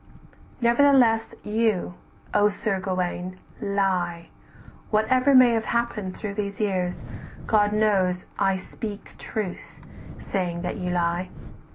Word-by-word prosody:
"Nevertheless 235 -2 +4
you, 210 -4 0 0.4
O 205 0 +4
Sir 200 -1 -2
Gauwaine, 185 -1 -3 0.2
lie, 185 -4 -1 0.6
Whatever 255 +6 +3
may 255 -2 +8
have 225 -1 0
happened 220 -5 -2
through 210 -2 -4
these 200 -1 -4
years, 185 -4 -1 0.4
God 210 -2 +3
knows 195 -4 +1
I 195 -1 +2
speak 205 +2 -7
truth, 205 -5 -5 0.4
saying 175 -3 -3
that 180 +5 -3
you 180 -2 -3
lie." 175 +1 0
200 Hz, 110 wpm, -25 LUFS, 185-220 Hz, 0.6 s, may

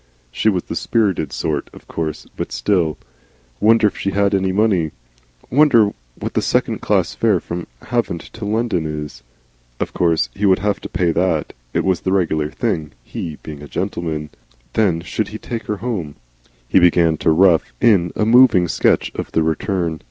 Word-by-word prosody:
She 110 - +1
was 90 -4 0
the - - -6
spirited 95 - 0
sort, 75 -3 -2
of - - -15
course, 80 -2 -4
but - - -4
still 85 -7 0 0.6
Wonder 110 0 +4
if 105 - +2
she 100 - -2
had 100 +1 +1
any 95 -1 +1
money? 95 -6 +1 0.6
Wonder 125 -7 +5 0.3
what - - -5
the - - +1
second - - 0
class - - +1
fare - - +2
from 85 0 -6 0.2
Havant 115 -8 -1
to 115 - -9
London 105 -6 0
is? 75 -1 -6 0.6
Of - - -3
course 85 -2 +1
he 100 +1 0
would 95 -1 +5
have 100 +1 -1
to - - -7
pay 85 -2 +1
that 85 -2 0 0.2
it - - 0
was 95 -3 +1
the 95 - -1
regular 80 -6 +1
thing, 75 -2 -2
he 80 +3 -6
being 75 -2 -8
a 75 - -9
gentleman. 75 -3 -3 0.4
Then 95 -7 +2
should 100 +4 -2
he 110 - -7
take 115 0 -6
her 105 - -2
home? 95 -11 -4 0.5
He 80 - +4
began 85 -2 +4
to - - +1
rough 85 0 +4
in 90 -7 +4
a 105 - +1
moving 115 -6 +6
sketch - - +1
of - - -5
the 80 - +2
return. 80 0 -1
90 Hz, 180 wpm, -19 LUFS, 80-105 Hz, 0.6 s, moving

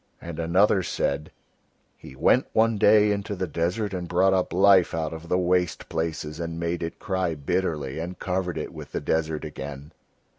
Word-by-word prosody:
And 85 -1 -7
another 95 +4 +3
said: 75 -3 -2 0.6
"He - - -13
went - - +3
one 110 -1 +3
day 105 0 +5
into 100 0 -2
the 95 - -2
desert 90 +5 -2
and 90 -2 -4
brought 95 +2 +3
up 95 -1 +1
life 95 -2 +5
out 80 -1 -2
of 80 +1 -9
the 90 - +2
waste 90 -1 0
places, 80 -1 -3
and 85 0 -4
made 85 +1 -2
it 85 -1 -4
cry 95 -3 -1
bitterly 75 -2 -2
and 90 +2 -5
covered 90 -2 -2
it 75 - -5
with - - -10
the - - -1
desert 80 -1 -1
again." 70 -1 -7
85 Hz, 180 wpm, -25 LUFS, 80-95 Hz, 0.6 s, day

